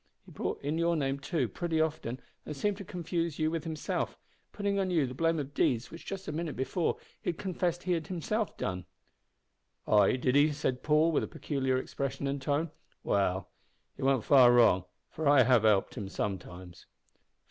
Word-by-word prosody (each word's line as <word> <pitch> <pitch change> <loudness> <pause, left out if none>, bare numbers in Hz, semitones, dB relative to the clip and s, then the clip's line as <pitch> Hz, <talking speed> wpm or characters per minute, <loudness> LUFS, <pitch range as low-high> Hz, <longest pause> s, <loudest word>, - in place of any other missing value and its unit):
He - - -15
brought - - -3
in 150 +3 -1
your 170 0 +2
name, 135 -2 -1
too, 140 -2 -1
pretty 160 - -2
often, 150 -6 -1 0.2
and 150 - -7
seemed 205 +5 0
to 200 - -7
confuse 170 -3 -3
you 155 0 +1
with 165 -1 -3
himself, 160 -2 -3 0.3
putting 200 -1 -1
on 190 -1 0
you 165 -6 +2
the 125 - -6
blame 165 +4 +1
of 145 -1 -4
deeds 120 -1 +1
which 165 - -11
just 195 -1 -5
a - - -2
minute 160 0 -3
before 155 +6 -1 0.2
he - - -2
had 170 - -2
confessed 175 -2 -2
he 185 - -1
had 165 -3 0
himself 205 +5 -2
done." 90 -1 -3 1.0
"Ay, 105 +2 +5
did 125 0 0
he?" 145 +2 +5
said 130 -3 -2
Paul, 155 +2 +3
with 155 - +2
a - - -3
peculiar 130 -3 -1
expression 135 +1 -3
and 140 0 -2
tone. 145 +3 0 0.3
"Well, 95 -2 0 0.4
he - - -11
warn't 135 -3 +2
far 130 -4 +7
wrong, 115 -7 +5 0.2
for 160 -1 -3
I 145 -3 +7
have 125 -2 +4
helped 105 -3 +3
him 100 -2 -6
sometimes." 90 -3 -6
145 Hz, 190 wpm, -30 LUFS, 125-165 Hz, 1.0 s, far